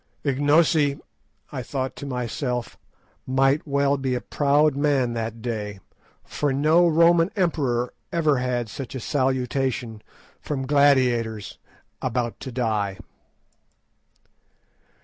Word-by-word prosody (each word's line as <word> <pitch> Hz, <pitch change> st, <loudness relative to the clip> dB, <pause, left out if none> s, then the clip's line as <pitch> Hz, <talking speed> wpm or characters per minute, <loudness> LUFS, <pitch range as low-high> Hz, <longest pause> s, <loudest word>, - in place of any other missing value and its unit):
Ignosi, 145 Hz, +1 st, +3 dB, 0.5 s
I 130 Hz, -, -4 dB
thought 130 Hz, +1 st, -4 dB
to 140 Hz, -, -6 dB
myself, 125 Hz, -1 st, -3 dB, 0.5 s
might 135 Hz, +3 st, +2 dB
well 140 Hz, 0 st, +2 dB
be 130 Hz, -2 st, -1 dB
a -, -, -1 dB
proud 145 Hz, 0 st, +2 dB
man 140 Hz, -4 st, +1 dB
that 115 Hz, -1 st, -4 dB
day, 105 Hz, -4 st, -4 dB, 0.4 s
for 145 Hz, -1 st, -2 dB
no 155 Hz, +6 st, +4 dB
Roman 170 Hz, +1 st, +4 dB
emperor 140 Hz, -, 0 dB, 0.2 s
ever 155 Hz, -5 st, +2 dB
had 125 Hz, -2 st, -1 dB
such 130 Hz, +4 st, -7 dB
a -, -, -3 dB
salutation 130 Hz, -3 st, -1 dB, 0.4 s
from 135 Hz, -3 st, -3 dB
gladiators 125 Hz, -7 st, +2 dB, 0.4 s
"about 120 Hz, -2 st, -2 dB
to 130 Hz, -, -7 dB
die." 110 Hz, -5 st, -1 dB
130 Hz, 110 wpm, -24 LUFS, 120-145 Hz, 0.5 s, no